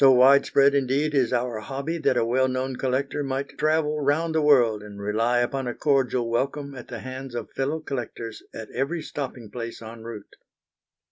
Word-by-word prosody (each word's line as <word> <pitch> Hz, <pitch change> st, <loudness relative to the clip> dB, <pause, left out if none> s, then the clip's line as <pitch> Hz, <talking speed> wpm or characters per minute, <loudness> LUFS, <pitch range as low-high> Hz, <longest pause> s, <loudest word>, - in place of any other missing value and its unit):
So 135 Hz, -1 st, +8 dB
widespread 140 Hz, +2 st, +6 dB
indeed 140 Hz, +2 st, +1 dB
is 130 Hz, -5 st, +2 dB
our 120 Hz, -2 st, 0 dB
hobby 140 Hz, +8 st, -4 dB
that 130 Hz, -, +2 dB
a 115 Hz, -, +3 dB
well 130 Hz, +3 st, +2 dB
known 130 Hz, 0 st, -2 dB
collector 135 Hz, +3 st, -1 dB
might 135 Hz, 0 st, -3 dB
travel 155 Hz, -1 st, +1 dB
round 155 Hz, +4 st, +1 dB
the 160 Hz, -, +2 dB
world 120 Hz, -8 st, +4 dB
and 105 Hz, -1 st, -10 dB
rely 115 Hz, +4 st, +1 dB
upon 130 Hz, +1 st, -1 dB
a 120 Hz, -, -3 dB
cordial 130 Hz, -4 st, +1 dB
welcome 140 Hz, +4 st, -1 dB
at 125 Hz, -3 st, -9 dB
the 120 Hz, -, -6 dB
hands 130 Hz, -1 st, -7 dB
of 120 Hz, -2 st, -5 dB
fellow 140 Hz, +4 st, -1 dB
collectors 120 Hz, -6 st, -5 dB
at 110 Hz, -1 st, -8 dB
every 155 Hz, +6 st, -2 dB
stopping 125 Hz, -6 st, -6 dB
place 115 Hz, 0 st, -6 dB
en 115 Hz, 0 st, -9 dB
route. 110 Hz, -3 st, -9 dB
130 Hz, 185 wpm, -25 LUFS, 120-140 Hz, -, So